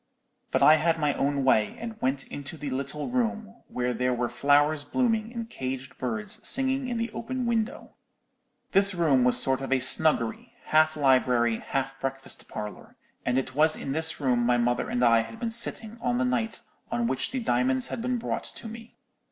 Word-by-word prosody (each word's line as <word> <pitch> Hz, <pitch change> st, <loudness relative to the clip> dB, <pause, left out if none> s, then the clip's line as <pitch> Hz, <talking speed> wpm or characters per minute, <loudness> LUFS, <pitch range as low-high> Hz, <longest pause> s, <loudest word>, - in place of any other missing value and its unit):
But -, -, +1 dB
I 155 Hz, +1 st, +8 dB
had 165 Hz, +1 st, +1 dB
my 150 Hz, -2 st, +1 dB
own 140 Hz, 0 st, 0 dB
way, 110 Hz, -5 st, +2 dB
and 225 Hz, -1 st, -7 dB
went 135 Hz, +1 st, -1 dB
into 145 Hz, +3 st, -8 dB
the 145 Hz, -2 st, -5 dB
little 140 Hz, +3 st, -3 dB
room, 230 Hz, -3 st, -2 dB
where 125 Hz, 0 st, -2 dB
there 125 Hz, +2 st, 0 dB
were 120 Hz, 0 st, -1 dB
flowers 145 Hz, +4 st, +2 dB
blooming 225 Hz, -, 0 dB
and 230 Hz, -2 st, -5 dB
caged 130 Hz, -, -5 dB
birds 110 Hz, -4 st, -1 dB
singing 265 Hz, 0 st, +2 dB
in 240 Hz, -, -2 dB
the 230 Hz, +1 st, -2 dB
open 255 Hz, +2 st, -4 dB
window. 235 Hz, +1 st, -2 dB, 0.8 s
"This 195 Hz, 0 st, +4 dB
room 150 Hz, -7 st, +3 dB
was 125 Hz, 0 st, +5 dB
a -, -, +3 dB
sort 135 Hz, 0 st, +1 dB
of 135 Hz, -, -5 dB
snuggery, 135 Hz, -4 st, +1 dB
half 155 Hz, 0 st, +3 dB
library, 125 Hz, -4 st, +3 dB
half 135 Hz, 0 st, -3 dB
breakfast 135 Hz, 0 st, -5 dB
parlour, 105 Hz, -1 st, -8 dB, 0.3 s
and 125 Hz, +1 st, +2 dB
it 130 Hz, 0 st, -2 dB
was 155 Hz, +3 st, +3 dB
in 135 Hz, -, -5 dB
this 160 Hz, +2 st, 0 dB
room 125 Hz, -4 st, +1 dB
my 120 Hz, 0 st, +3 dB
mother 120 Hz, 0 st, 0 dB
and 125 Hz, 0 st, +1 dB
I 115 Hz, -1 st, +5 dB
had 115 Hz, 0 st, -5 dB
been 230 Hz, -, -2 dB
sitting 230 Hz, -1 st, -1 dB
on 245 Hz, 0 st, 0 dB
the 250 Hz, -, +1 dB
night 235 Hz, -5 st, -1 dB, 0.3 s
on 235 Hz, 0 st, 0 dB
which 235 Hz, -, -1 dB
the 260 Hz, -, -3 dB
diamonds 130 Hz, -, 0 dB
had -, -, -4 dB
been 250 Hz, +1 st, -1 dB
brought 235 Hz, -, -3 dB
to -, -, -8 dB
me. 225 Hz, +1 st, -11 dB
145 Hz, 195 wpm, -27 LUFS, -, 0.8 s, I